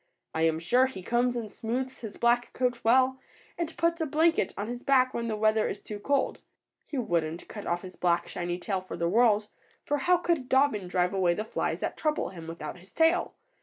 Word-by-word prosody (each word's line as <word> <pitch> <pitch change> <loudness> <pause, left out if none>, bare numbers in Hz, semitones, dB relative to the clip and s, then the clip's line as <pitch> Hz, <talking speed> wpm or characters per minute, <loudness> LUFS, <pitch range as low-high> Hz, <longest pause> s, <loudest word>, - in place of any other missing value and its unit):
I 160 0 +2
am 160 -1 +1
sure 245 +11 +3
he 190 -8 -8
combs 240 +4 +1
and 225 -3 -4
smooths 255 +3 -3
his 220 -4 -7
black 240 +1 +2
coat 250 -1 0
well, 260 +3 +4 0.4
and 335 -1 -4
puts 335 0 +1
a 320 - 0
blanket 320 +3 +2
on 205 - -2
his 240 +2 -5
back 260 -2 +3
when 235 0 -2
the 220 - -1
weather 215 0 +2
is - - -5
too 210 -1 -7
cold. 280 +6 0 0.5
He 290 - -5
wouldn't 170 -7 -1
cut 210 - -8
off 175 +1 -1
his 185 -1 -9
black, 175 -1 +1
shiny 175 0 -3
tail 190 +1 -2
for 185 - -7
the 170 - 0
world, 215 +1 +3 0.4
for 290 - +1
how 355 +6 +4
could 335 -7 -1
Dobbin 265 -8 +3
drive 180 +1 +1
away 180 -3 +2
the 215 - -3
flies - - -2
that - - -3
trouble 305 -1 0
him, 170 -4 -10
without 165 0 -7
his 185 +3 -18
tail? 330 +2 +2
230 Hz, 215 wpm, -28 LUFS, 185-265 Hz, 0.5 s, well